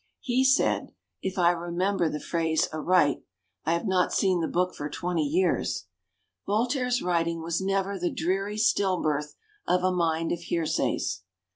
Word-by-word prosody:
He 255 Hz, +1 st, +1 dB
said, 265 Hz, 0 st, +2 dB, 0.3 s
if 190 Hz, +1 st, -3 dB
I 175 Hz, -1 st, +5 dB
remember 175 Hz, +1 st, 0 dB
the 150 Hz, -, -4 dB
phrase 160 Hz, -1 st, 0 dB
aright 155 Hz, -2 st, +2 dB, 0.4 s
(I 165 Hz, -, +2 dB
have 170 Hz, -, -1 dB
not 185 Hz, -2 st, +2 dB
seen 185 Hz, -3 st, +2 dB
the 160 Hz, -, 0 dB
book 180 Hz, +1 st, 0 dB
for 145 Hz, -, -5 dB
twenty 175 Hz, +2 st, -2 dB
years): 165 Hz, -, 0 dB, 0.6 s
"Voltaire's 250 Hz, +4 st, +1 dB
writing 170 Hz, -2 st, 0 dB
was 170 Hz, +2 st, -1 dB
never 195 Hz, 0 st, -1 dB
the 175 Hz, 0 st, 0 dB
dreary 195 Hz, +5 st, -1 dB
still 195 Hz, -3 st, +2 dB
birth 150 Hz, -1 st, -1 dB, 0.3 s
of 180 Hz, 0 st, +2 dB
a 185 Hz, -, +3 dB
mind 165 Hz, -2 st, 0 dB
of 170 Hz, -, -1 dB
hear 170 Hz, -1 st, -2 dB
says." 95 Hz, -10 st, -1 dB
175 Hz, 160 wpm, -27 LUFS, 165-195 Hz, 0.6 s, I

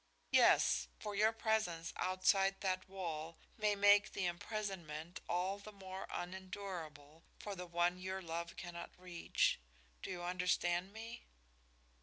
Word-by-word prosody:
"Yes, -, -, +6 dB
for 210 Hz, -, -5 dB
your 215 Hz, +2 st, +4 dB
presence 220 Hz, -7 st, 0 dB
outside 195 Hz, +1 st, +3 dB
that 185 Hz, -1 st, -1 dB
wall 165 Hz, -4 st, -4 dB, 0.2 s
may 210 Hz, -1 st, +2 dB
make 205 Hz, +1 st, +6 dB
the 190 Hz, -, 0 dB
imprisonment 175 Hz, -3 st, -4 dB
all 185 Hz, +3 st, 0 dB
the 215 Hz, +1 st, -9 dB
more 190 Hz, -1 st, -7 dB
unendurable 175 Hz, -5 st, -6 dB, 0.2 s
for 205 Hz, -, -5 dB
the 180 Hz, -1 st, -6 dB
one 175 Hz, +1 st, +2 dB
your 190 Hz, +1 st, -3 dB
love 170 Hz, 0 st, -4 dB
cannot 175 Hz, -1 st, -7 dB
reach. 180 Hz, -, +1 dB, 0.4 s
Do -, -, -5 dB
you 180 Hz, -2 st, -4 dB
understand 180 Hz, 0 st, +1 dB
me?" 225 Hz, +2 st, -8 dB
185 Hz, 130 wpm, -38 LUFS, 175-200 Hz, 0.4 s, Yes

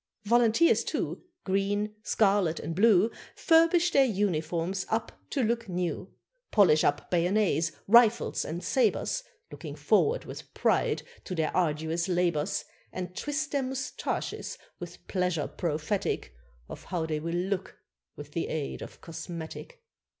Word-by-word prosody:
Volunteers, 235 Hz, +8 st, +4 dB
too, -, -, -3 dB, 0.2 s
Green, 205 Hz, +2 st, 0 dB
scarlet, 195 Hz, -7 st, +2 dB
and 165 Hz, -, -4 dB
blue, 215 Hz, +1 st, +5 dB, 0.2 s
Furbish 330 Hz, +2 st, +4 dB
their 275 Hz, -, +5 dB
uniforms 185 Hz, -4 st, -1 dB
up 220 Hz, +1 st, -1 dB, 0.2 s
to 275 Hz, -, 0 dB
look 230 Hz, -1 st, -1 dB
new, 180 Hz, -1 st, -3 dB, 0.4 s
Polish 180 Hz, -8 st, +5 dB
up 145 Hz, -, 0 dB
bayonets, 175 Hz, -1 st, +2 dB, 0.2 s
rifles, 235 Hz, +1 st, +5 dB
and 170 Hz, +3 st, -5 dB
sabres, 270 Hz, -, +1 dB, 0.3 s
Looking -, -, -7 dB
forward 475 Hz, +3 st, +2 dB
with -, -, -10 dB
pride -, -, +1 dB, 0.2 s
to 185 Hz, -, -4 dB
their 160 Hz, -2 st, -1 dB
arduous 160 Hz, 0 st, 0 dB
labours, 175 Hz, -2 st, 0 dB, 0.3 s
And 180 Hz, -1 st, -6 dB
twist 295 Hz, +4 st, -2 dB
their 280 Hz, -, +1 dB
moustaches 265 Hz, +1 st, -4 dB, 0.2 s
with -, -, -10 dB
pleasure 180 Hz, -5 st, 0 dB
prophetic 160 Hz, -, -2 dB, 0.3 s
Of -, -, -10 dB
how 175 Hz, -4 st, -2 dB
they 155 Hz, -1 st, -2 dB
will 165 Hz, +2 st, -3 dB
look 190 Hz, +2 st, -2 dB, 0.4 s
with -, -, -10 dB
the -, -, -2 dB
aid 65 Hz, -1 st, -4 dB
of -, -, -10 dB
cosmetic. 165 Hz, -, -8 dB
190 Hz, 130 wpm, -28 LUFS, 165-230 Hz, 0.4 s, blue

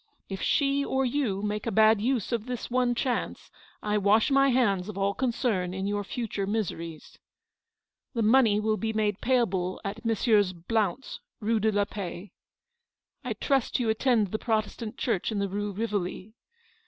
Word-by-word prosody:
If 195 Hz, -1 st, -5 dB
she 280 Hz, -1 st, +2 dB
or 265 Hz, -1 st, 0 dB
you 240 Hz, -7 st, -1 dB
make 210 Hz, +1 st, -2 dB
a -, -, 0 dB
bad 220 Hz, 0 st, +5 dB
use 245 Hz, -2 st, 0 dB
of 235 Hz, -1 st, -2 dB
this 245 Hz, -1 st, -5 dB
one 250 Hz, -1 st, +2 dB
chance, 245 Hz, 0 st, -2 dB, 0.3 s
I 210 Hz, 0 st, +1 dB
wash 210 Hz, +6 st, +3 dB
my 275 Hz, 0 st, +5 dB
hands 210 Hz, -7 st, +2 dB
of 205 Hz, -, -7 dB
all 200 Hz, 0 st, +1 dB
concern 225 Hz, -7 st, -1 dB
in 190 Hz, 0 st, -3 dB
your 205 Hz, 0 st, -1 dB
future 205 Hz, -2 st, -3 dB
miseries. 170 Hz, -7 st, -4 dB, 0.5 s
" -, -, -62 dB
The 230 Hz, -, +1 dB
money 220 Hz, -2 st, +5 dB
will 215 Hz, 0 st, 0 dB
be 220 Hz, 0 st, -2 dB
made 210 Hz, -2 st, 0 dB
payable 195 Hz, -8 st, +1 dB
at 210 Hz, +3 st, -5 dB
Messrs. 215 Hz, -4 st, +2 dB
Blount's, 210 Hz, +6 st, -2 dB, 0.2 s
Rue 220 Hz, +1 st, +1 dB
de 220 Hz, +1 st, +2 dB
la 205 Hz, -1 st, +1 dB
Paix. 195 Hz, -2 st, -7 dB, 0.5 s
" 470 Hz, 0 st, -55 dB
I -, -, -2 dB
trust 270 Hz, -4 st, 0 dB
you 235 Hz, -3 st, 0 dB
attend 220 Hz, -3 st, +2 dB
the 215 Hz, -, -2 dB
Protestant 220 Hz, +1 st, -2 dB
Church 230 Hz, -6 st, -1 dB
in 215 Hz, -, -2 dB
the 200 Hz, 0 st, 0 dB
Rue 205 Hz, +2 st, -3 dB
Rivoli. 205 Hz, -1 st, -3 dB
215 Hz, 175 wpm, -27 LUFS, 200-240 Hz, 0.5 s, bad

